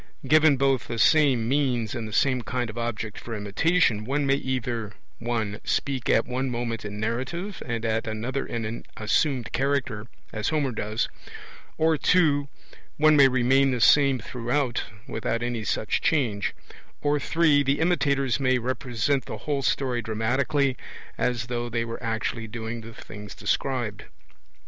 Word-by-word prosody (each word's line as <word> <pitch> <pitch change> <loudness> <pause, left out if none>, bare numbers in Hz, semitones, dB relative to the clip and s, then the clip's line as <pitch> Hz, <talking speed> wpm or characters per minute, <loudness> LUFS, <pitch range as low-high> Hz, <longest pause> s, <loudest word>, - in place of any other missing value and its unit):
Given 155 0 +5
both 135 -1 +1
the 115 - -4
same 130 -2 +4
means 125 -5 +1
and 120 -3 -4
the - - -8
same 130 +3 +2
kind 120 0 -3
of 115 - -13
object 115 -2 -4
for 115 - -6
imitation, 110 - +1
one 140 +5 0
may 135 - +3
either 125 -5 -2 0.3
(1) 115 -3 -2
speak 135 -4 -1
at 115 - +4
one 130 +1 -2
moment 120 -1 -3
in 105 0 -6
narrative 130 - -3
and 115 -1 -2
at 115 0 0
another 115 +5 -2
in 115 -1 -4
an 110 +2 -5
assumed 120 +3 0
character, 130 -5 -1 0.3
as 110 0 -1
Homer 145 -4 0
does; 110 0 -2 0.7
or 160 0 +3
(2) 145 -3 +3 0.5
one 155 0 +5
may 140 -2 +8
remain 130 +2 +3
the 125 -2 -1
same 140 +2 +5
throughout, 125 +1 -2 0.2
without 115 +1 -2
any 120 -2 -2
such 105 0 -1
change; 115 -10 0 0.5
or 145 0 +1
(3) 150 0 +3
the 140 +1 +1
imitators 140 -7 +1
may 130 -2 +3
represent 125 +1 -1
the - - -6
whole 145 -2 0
story 130 -2 0
dramatically, 130 +5 0 0.4
as 120 -2 -1
though 120 0 -3
they 115 0 -1
were 115 +1 -6
actually 115 0 -2
doing 115 +1 -5
the 115 +1 -10
things 105 -1 -10
described. 120 -6 -2
125 Hz, 155 wpm, -26 LUFS, 115-140 Hz, 0.7 s, may